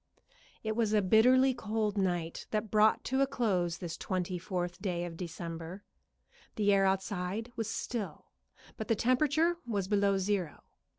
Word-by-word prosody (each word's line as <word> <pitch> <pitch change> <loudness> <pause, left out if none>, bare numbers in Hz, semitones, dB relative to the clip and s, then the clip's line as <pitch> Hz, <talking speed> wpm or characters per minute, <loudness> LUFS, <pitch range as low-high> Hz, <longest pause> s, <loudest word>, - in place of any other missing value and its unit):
It 220 -1 -1
was 220 -2 +1
a 210 - +4
bitterly 255 +7 +5
cold 215 -3 -2
night 175 -4 -1
that 215 -1 -2
brought 215 0 +4
to 265 +1 0
a 275 - +4
close 185 -10 0
this 170 -2 -5
twenty 185 -1 -2
fourth 180 0 -3
day 175 -3 -1
of 170 -1 -7
December. 170 +2 -6 0.7
The 205 -1 +3
air 195 0 +4
outside 190 +3 -2
was 225 -1 -3
still, 225 -2 -4 0.5
but 220 - -5
the 225 - +3
temperature 295 +9 +2
was 200 -7 -2
below 200 -1 +2
zero. 190 -5 -2
205 Hz, 155 wpm, -31 LUFS, 180-225 Hz, 0.7 s, bitterly